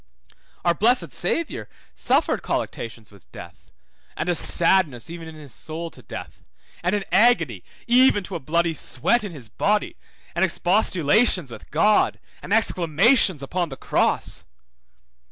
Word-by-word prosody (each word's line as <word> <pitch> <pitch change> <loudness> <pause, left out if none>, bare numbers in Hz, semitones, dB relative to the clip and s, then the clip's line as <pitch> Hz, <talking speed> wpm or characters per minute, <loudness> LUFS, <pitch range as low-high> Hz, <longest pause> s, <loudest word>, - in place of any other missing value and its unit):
Our 170 - +4
blessed 235 +8 +1
Saviour 295 - -1 0.2
suffered - - +1
colluctations 115 -2 -5
with 100 -4 -20
death, - - -13 0.5
and - - -2
a - - +3
sadness 165 -6 +2
even 170 -1 -8
in 160 - -10
his 145 -5 -12
soul 160 +6 -6
to - - -14
death, - - -9 0.4
and 180 +4 0
an 205 - -2
agony 170 - +3 0.2
even 245 -4 +4
to 190 - -9
a 170 - -3
bloody 170 +4 0
sweat 185 - 0
in 205 - -5
his 135 -8 -10
body, 205 - -1 0.4
and 170 - 0
expostulations 185 - +2
with - - -11
God, 210 +8 +2 0.2
and 180 - -10
exclamations 185 - +3
upon 175 +4 -2
the 135 - -8
cross. - - -1
170 Hz, 140 wpm, -23 LUFS, 150-205 Hz, 0.5 s, Our